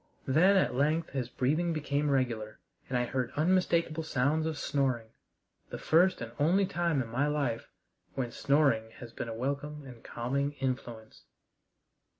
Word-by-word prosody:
Then 180 +9 +5
at 185 - +2
length 155 +5 +1
his 130 -3 -3
breathing 155 +8 0
became 150 -1 -1
regular 120 -6 -1 0.3
and 130 - 0
I 125 - +1
heard 125 0 -2
unmistakable 170 -1 +2
sounds 155 +1 0
of 160 -2 -3
snoring 130 -7 -1 0.6
the - - -5
first 180 +1 +3
and 115 -1 -5
only 180 +7 +3
time 170 -6 0
in - - -9
my 130 +6 +1
life 140 -6 -1 0.5
when 125 -3 -2
snoring 140 -5 +2
has 120 -2 -10
been 115 - -5
a 115 - -5
welcome 140 +4 -3
and 125 -3 -12
calming 140 +4 -2
influence. 125 -5 -5
140 Hz, 155 wpm, -30 LUFS, 125-155 Hz, 0.6 s, Then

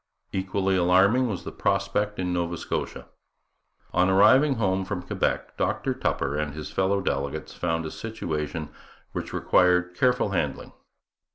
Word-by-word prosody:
Equally 95 0 0
alarming 95 +8 +4
was 105 -6 -4
the - - -6
prospect 100 +1 0
in 90 -1 -1
Nova 85 -1 -1
Scotia. - - -4 0.9
On 90 +1 +3
arriving 130 +9 +5
home 95 -4 0
from 95 -1 -4
Quebec, - - -2
Dr - - 0
Tupper 70 +1 -1
and 75 -1 -2
his 75 -1 -6
fellow 100 +1 +1
delegates 70 -3 -3
found 80 -1 -2
a 80 - -5
situation 80 -8 -4 0.4
which - - -5
required 90 0 +3
careful 125 +1 +2
handling. 80 -7 -2
95 Hz, 140 wpm, -26 LUFS, 80-100 Hz, 0.9 s, arriving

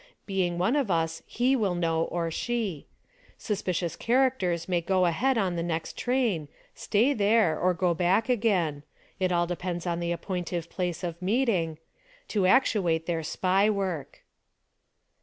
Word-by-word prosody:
Being 185 -3 -1
one 190 +10 +1
of 275 -7 +1
us 165 -2 0
he 255 +3 +1
will 200 -7 0
know, 165 -1 +1
or 170 -1 -2
she. 215 - -3 0.5
Suspicious 180 -5 -2
characters 235 -9 +1
may 175 -2 +1
go 185 +1 +2
ahead 240 +10 +1
on 190 -5 0
the 170 - -1
next 165 -1 -3
train, 240 - 0 0.3
stay 235 +8 +1
there, 205 - +3
or 180 0 +2
go 175 0 +1
back 185 +7 +2
again 195 - +1 0.2
— - - -33
it 185 -1 +1
all 175 -1 +2
depends 175 0 -4
on 170 -1 -1
the 170 0 -2
appointive 175 -1 -4
place 180 -1 -3
of 170 0 -4
meeting 185 -6 +1 0.2
— - - -30
to 200 -4 +2
actuate 185 -8 +3
their 165 -1 -1
SPY 190 +5 +1
work. 185 -9 -3
180 Hz, 160 wpm, -27 LUFS, 170-215 Hz, 0.5 s, there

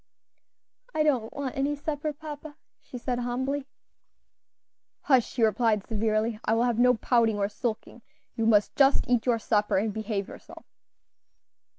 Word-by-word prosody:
"I 310 - +3
don't 255 -7 +1
want 275 -3 -5
any 280 +2 0
supper, 295 +1 -3
papa," 295 0 -9 0.3
she 250 - -9
said, 245 0 -3
humbly. 260 +3 -2 1.3
"Hush," 260 -5 +2
he 240 - +1
replied, 220 -2 +2
severely; 220 0 -1
"I 225 - +1
will 230 - +2
have 240 -2 0
no 250 +1 +5
pouting 225 -2 +2
or 200 -1 +1
sulking; 235 +1 -5 0.3
you 225 -1 -1
must 210 -2 +3
just 275 0 +3
eat 245 -1 +1
your 240 -2 +3
supper 210 -3 +1
and 210 +2 0
behave 215 -2 -3
yourself. - - -13
240 Hz, 150 wpm, -27 LUFS, 220-270 Hz, 1.3 s, no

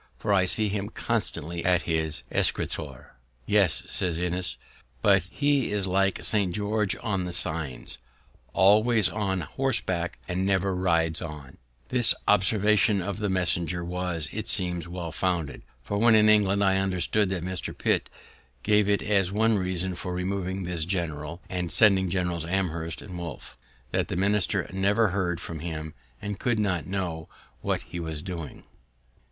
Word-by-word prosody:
for 105 - 0
I 95 -2 +4
see 105 +3 +5
him 100 0 -3
constantly 85 -5 -2
at 90 -1 +2
his 80 -2 -2
escritoire." - - -2 0.3
"Yes," 95 -3 +4
says 90 -4 -1
Innis, 90 +1 -2 0.5
"but 95 -2 +4
he 140 +2 0
is 105 -2 +2
like 95 +1 +1
St. 100 -5 +1
George 105 -1 0
on 100 -4 -1
the 90 - -4
signs, 80 -9 -2 0.5
always 105 +2 +4
on 95 -3 -1
horseback, 95 - -1
and 90 +1 -1
never 95 0 +1
rides 85 -3 +1
on." 75 -5 -8 0.3
This 125 -2 +6
observation 105 +1 +4
of 100 +3 -4
the 105 -1 -1
messenger 90 -2 0
was, 90 -3 -3
it - - -4
seems, 90 -2 -1
well 85 -1 -5
founded; 85 -4 -2 0.2
for, 100 +10 -2
when 115 0 +6
in 110 0 +5
England, 100 -2 +4
I 95 -1 +3
understood 95 +1 +1
that 90 -3 -3
Mr. 95 -1 -3
Pitt - - +1 0.5
gave 105 -1 +3
it 100 - +2
as 100 -3 +1
one 110 +1 +2
reason 95 0 -2
for 90 0 -5
removing 95 +1 -2
this 85 -2 -2
general, 85 -2 -3
and 90 -2 -3
sending 95 -4 +4
Generals 90 -2 -1
Amherst 85 -4 -2
and 95 -4 -9
Wolfe, 85 -2 -8 0.4
that - - 0
the - - -4
minister 100 +1 +1
never 100 +3 +2
heard 90 -3 -1
from 85 -2 -6
him, 80 -1 -5 0.3
and 100 -1 -5
could 120 -3 0
not 95 -6 -1
know 90 -5 -4 0.3
what - - -1
he 85 - -7
was 80 -2 -5
doing. 85 -6 -7
95 Hz, 155 wpm, -26 LUFS, 85-100 Hz, 0.5 s, This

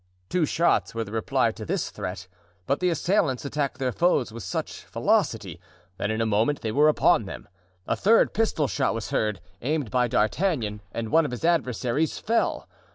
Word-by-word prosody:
Two 175 -4 +1
shots 170 -6 +1
were 115 - -1
the 105 - -10
reply 110 -1 +1
to - - -9
this - - -2
threat; 90 0 -6 0.4
but 140 +2 0
the 180 - +2
assailants 165 - +1
attacked 140 -1 -2
their 130 -2 -1
foes 145 -6 +1
with 115 - -7
such 95 - -4
velocity - - 0 0.4
that 100 - -2
in 110 +1 -1
a 115 - +1
moment 110 +7 +1
they 110 - -2
were 150 +5 +5
upon 155 - +3
them; - - -8 0.4
a - - 0
third 225 +3 +4
pistol 215 -10 +1
shot 135 -4 0
was 115 - -5
heard, 105 -2 0 0.2
aimed 145 -2 -1
by 125 -1 +2
D'Artagnan, 115 - 0
and 115 +1 -4
one 165 +1 +5
of 150 - -2
his 125 +5 -4
adversaries 145 -2 +1
fell. 230 +2 0
130 Hz, 185 wpm, -25 LUFS, 115-160 Hz, 0.4 s, were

